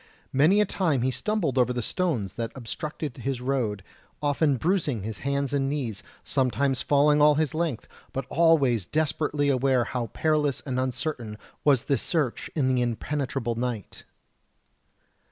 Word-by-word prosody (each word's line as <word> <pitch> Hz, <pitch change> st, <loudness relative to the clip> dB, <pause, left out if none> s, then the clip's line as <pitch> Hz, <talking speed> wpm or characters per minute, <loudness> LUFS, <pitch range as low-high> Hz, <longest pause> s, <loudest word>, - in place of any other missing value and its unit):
Many 155 Hz, +10 st, +5 dB
a -, -, +3 dB
time 160 Hz, -10 st, 0 dB
he 130 Hz, -, +2 dB
stumbled 145 Hz, -, -1 dB
over 125 Hz, 0 st, +3 dB
the 120 Hz, -1 st, -2 dB
stones 130 Hz, -, -1 dB
that 115 Hz, -1 st, -4 dB
obstructed 145 Hz, +3 st, -5 dB
his 130 Hz, 0 st, -3 dB
road, 125 Hz, -7 st, -1 dB, 0.4 s
often 145 Hz, -1 st, +2 dB
bruising 150 Hz, -, 0 dB
his 110 Hz, -1 st, -5 dB
hands 140 Hz, 0 st, -1 dB
and 135 Hz, -1 st, +1 dB
knees, 125 Hz, -8 st, -3 dB, 0.2 s
sometimes 135 Hz, 0 st, +1 dB
falling 145 Hz, +1 st, +4 dB
all 150 Hz, 0 st, +6 dB
his 155 Hz, -2 st, 0 dB
length, 155 Hz, -7 st, -2 dB, 0.2 s
but 135 Hz, -1 st, -3 dB
always 140 Hz, -, +3 dB
desperately 150 Hz, -1 st, 0 dB
aware 130 Hz, -2 st, +3 dB
how 120 Hz, -1 st, -3 dB
perilous 150 Hz, 0 st, 0 dB
and 130 Hz, -2 st, -3 dB
uncertain 130 Hz, -3 st, -3 dB, 0.3 s
was 135 Hz, -5 st, +4 dB
this 140 Hz, -5 st, +1 dB
search 150 Hz, -8 st, -1 dB
in 140 Hz, -5 st, +2 dB
the 130 Hz, -1 st, +2 dB
impenetrable 125 Hz, 0 st, -2 dB
night. 115 Hz, -3 st, -4 dB
135 Hz, 150 wpm, -26 LUFS, 125-150 Hz, 0.4 s, all